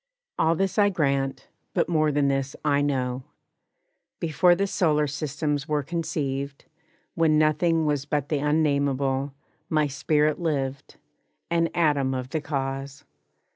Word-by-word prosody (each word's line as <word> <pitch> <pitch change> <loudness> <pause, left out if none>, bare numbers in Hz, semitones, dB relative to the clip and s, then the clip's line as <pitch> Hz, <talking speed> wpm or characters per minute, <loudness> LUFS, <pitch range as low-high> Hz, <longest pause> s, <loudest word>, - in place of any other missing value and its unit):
All 160 +1 +3
this 195 +4 0
I 205 0 +5
grant, 140 -6 -1 0.3
but - - +2
more 155 -3 +2
than 145 -1 +2
this 135 0 -1
I 145 -1 +3
know! 130 -3 -1 1.0
Before 175 +2 +3
the 200 +3 0
solar 155 -6 +2
systems 150 0 -2
were 150 -2 0
conceived, 140 -4 -3 0.5
When 160 -2 +3
nothing 155 +2 +2
was 145 -2 0
but 145 -1 -2
the 150 - 0
unnamable, 140 -2 +1 0.3
My 155 -2 +2
spirit 150 +2 +1
lived, 140 -4 -2 0.6
an 165 -1 +2
atom 145 -6 +2
of 130 0 -4
the 155 +2 -2
Cause. 135 -1 -4
150 Hz, 135 wpm, -25 LUFS, 140-160 Hz, 1.0 s, I